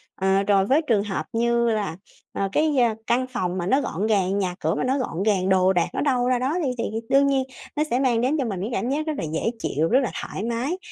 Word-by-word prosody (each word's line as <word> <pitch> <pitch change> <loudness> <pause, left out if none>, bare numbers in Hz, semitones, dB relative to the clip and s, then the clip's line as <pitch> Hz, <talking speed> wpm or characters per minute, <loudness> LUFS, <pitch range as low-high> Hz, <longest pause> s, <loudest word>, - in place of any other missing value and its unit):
Ờ, 190 +1 +2
rồi 195 -1 +3
với 280 +8 +3
trường 210 -4 +3
hợp 205 -2 -3
như 235 +1 +2
là, 210 -6 -2 0.4
ờ, 195 - -1
cái 305 +3 +2
gia 240 -5 +2
căn 255 +2 +1
phòng 185 -8 -2
mà 175 - -2
nó 270 +6 +3
gọn 195 0 -2
gàng, 195 -2 +1
nhà 180 -2 -1
cửa - - 0
mà - - -1
nó 260 +2 +1
gọn 200 -8 -2
gàng, 195 -3 +1
đồ 190 0 +4
đạc 175 - +2
nó - - -2
đâu 250 -4 +1
ra 250 -1 +2
đó 260 +5 0
đi 275 - 0
thì - - -2 0.3
đương 280 +1 +4
nhiên 270 -1 +2 0.3
nó 300 - +2
sẽ 245 - +2
mang 245 -4 +2
đến 270 +6 +1
cho 265 - 0
mình 195 -5 -3
cái 205 - -3
cảm 245 - -1
giác 305 +3 -1
rất 310 - 0
là - - -3
dễ 225 +8 0
chịu, 160 +3 0
rất 255 - +4
là 240 - -2
thoải 195 - -5
mái. 235 +9 -2
230 Hz, 270 wpm, -24 LUFS, 195-260 Hz, 0.4 s, đồ